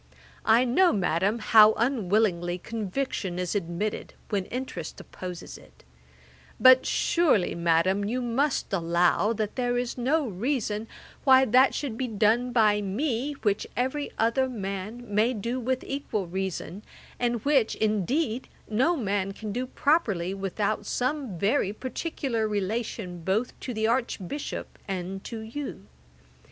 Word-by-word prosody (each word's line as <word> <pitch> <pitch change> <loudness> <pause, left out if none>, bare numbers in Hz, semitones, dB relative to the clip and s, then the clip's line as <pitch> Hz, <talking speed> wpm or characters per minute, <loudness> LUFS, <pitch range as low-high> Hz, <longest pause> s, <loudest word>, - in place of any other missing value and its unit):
I 230 +3 +5
know, 345 +9 +4
Madam, 195 +2 +1
how 215 -1 +7
unwillingly 205 -7 +1
conviction 210 -1 -3
is 180 -1 -2
admitted, 195 +1 -3
when 200 -3 -1
interest 240 -10 -6
opposes 180 -2 -8
it; - - -20 0.8
but 255 0 +7
surely, 305 - +2
Madam, 170 +4 +2
you 240 +5 -1
must 250 0 0
allow, 175 +4 +2
that 215 +1 -3
there 245 -1 0
is 245 0 -3
no 285 +5 +2
reason 220 0 -2 0.4
why 265 -1 +6
that 255 +3 +4
should 255 -6 -4
be 260 - -1
done 225 +3 +2
by 215 -3 +3
me, 240 +7 -1
which 205 -2 +1
every 265 +4 -1
other 245 +4 +2
man 205 +1 -5
may 215 +5 +2
do 235 +5 -2
with 255 +1 -1
equal 235 -8 -3
reason, 190 +1 -4 0.4
and 240 -1 -1
which, 275 -6 +3
indeed, 220 - 0 0.2
no 260 +11 +2
man 200 -4 -1
can 215 +1 -6
do 250 +4 -2
properly, 235 - +1
without 200 +2 -2
some 255 - -2
very 200 - +1
particular 255 -1 -3
relation 205 -3 -3
both 210 +7 0
to 255 - -5
the 220 -2 -1
Archbishop 235 +1 -2
and 190 0 -4
to 230 -2 -6
you. 230 - -6
220 Hz, 135 wpm, -27 LUFS, 195-255 Hz, 0.8 s, how